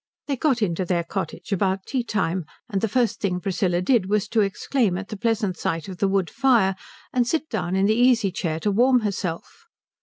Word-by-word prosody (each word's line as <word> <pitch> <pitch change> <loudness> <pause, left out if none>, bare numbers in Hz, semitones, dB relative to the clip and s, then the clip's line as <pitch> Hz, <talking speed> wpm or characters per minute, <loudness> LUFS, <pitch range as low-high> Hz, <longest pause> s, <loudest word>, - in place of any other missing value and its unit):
They 280 - -1
got 260 -4 +1
into 180 -1 0
their 175 -1 0
cottage 190 +3 -5
about 190 0 0
tea 255 -2 -1
time; 190 -6 -1 0.2
and 195 -4 -2
the 225 - +1
first 240 +1 +1
thing 180 -3 -1
Priscilla 180 -2 0
did 210 -2 +2
was 210 0 +1
to 225 - +2
exclaim 200 0 0
at 195 +1 -7
the 215 - -5
pleasant 215 -4 -1
sight 165 +1 -2
of 185 -2 -8
the 200 - +2
wood 195 -3 0
fire 235 -8 +3 0.4
and 245 -2 +2
sit 315 +3 0
down 175 +2 -2
in 190 +1 +3
the 215 - +4
easy 235 -4 +3
chair 165 -3 -2
to 205 - +1
warm 250 +4 +4
herself. 205 - -4
200 Hz, 210 wpm, -24 LUFS, 185-235 Hz, 0.4 s, the